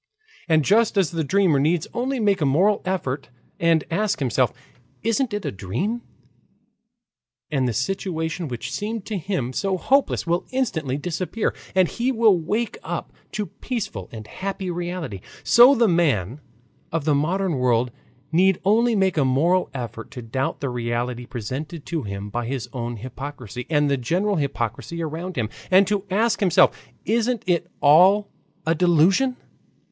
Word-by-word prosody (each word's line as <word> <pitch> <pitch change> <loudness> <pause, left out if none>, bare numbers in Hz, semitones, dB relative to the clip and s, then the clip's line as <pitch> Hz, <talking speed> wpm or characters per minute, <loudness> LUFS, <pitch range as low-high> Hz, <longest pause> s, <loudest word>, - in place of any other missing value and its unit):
And 155 -3 +4
just 220 +1 +3
as 190 -6 +3
the 165 -2 -1
dreamer 175 -2 +3
need 155 +3 +1
only 255 +3 -1
make 200 -4 +2
a - - +3
moral 190 +9 +3
effort 145 -9 -2 0.3
and 165 -2 +3
ask 210 +4 +1
himself, 130 -6 +1 0.5
"Isn't 230 +3 +1
it 205 -1 -3
a - - -1
dream?" 120 - -3 1.5
and 135 -4 +1
the 120 - -1
situation 165 - -2
which 125 0 -5
seemed 210 +6 -3
to 215 - -3
him 170 -9 -2
so 195 +6 0
hopeless 275 +9 +2
will 170 +1 0
instantly 160 - -1
disappear, 180 +7 -2 0.2
and 185 -2 +5
he 240 +7 -1
will 225 -5 +5
wake 215 - -2
up - - -5 0.2
to 210 - -2
peaceful 195 - -5
and 110 -2 -8
happy 190 - -4
reality, 175 - -4 0.2
so 245 +4 +7
the 235 -2 +4
man 145 - +1 0.5
of 165 -3 -2
the 155 - +3
modern 170 +2 0
world 125 -1 +2 0.4
need 185 +3 +4
only 230 +3 +4
make 190 -3 +2
a 145 - +4
moral 160 +8 +2
effort 115 -4 -6
to 125 -4 -8
doubt 130 +4 -2
the 140 - -1
reality 120 0 -3
presented 135 +7 -5
to 165 -2 -2
him 100 -1 -6
by 120 +1 -2
his 130 -3 -3
own 120 -2 -3
hypocrisy 125 0 -7
and 150 -2 +3
the 140 -1 +1
general 180 - 0
hypocrisy 140 +2 -3
around 165 +4 -5
him, 115 -3 0 0.2
and 190 +1 +6
to 205 0 -1
ask 220 +4 +1
himself, 185 -5 +4 0.3
"Isn't 235 +1 +1
it 175 -3 0
all 185 +8 +6 0.4
a 165 - +3
delusion?" 180 - +3
170 Hz, 160 wpm, -23 LUFS, 130-200 Hz, 1.5 s, so